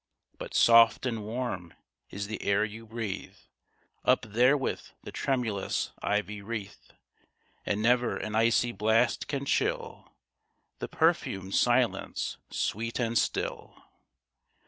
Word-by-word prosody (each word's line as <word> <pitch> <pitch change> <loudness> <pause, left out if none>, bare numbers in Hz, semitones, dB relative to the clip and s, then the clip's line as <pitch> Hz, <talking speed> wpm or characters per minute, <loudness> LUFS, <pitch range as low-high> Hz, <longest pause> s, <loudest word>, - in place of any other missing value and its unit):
But - - -7
soft 115 +1 +6
and 115 -4 -2
warm 110 -6 -4 0.3
is 100 +1 -5
the 110 +1 -5
air 100 +2 +2
you 110 +1 -9
breathe 110 -3 -5 0.7
Up - - +3
therewith 125 +6 +2 0.2
the - - -8
tremulous 115 -7 -1
ivy 105 0 -1
wreath, 105 -1 -7 0.8
And 105 +1 0
never 120 +1 +3
an 110 - -5
icy 115 +2 +3
blast 110 +1 +1
can 140 -1 -3
chill - - -1 0.7
The - - -4
perfumed 95 0 0
silence 120 -1 +1
sweet 115 +2 -2
and 115 -1 0
still. - - -1
115 Hz, 115 wpm, -29 LUFS, 105-120 Hz, 0.8 s, soft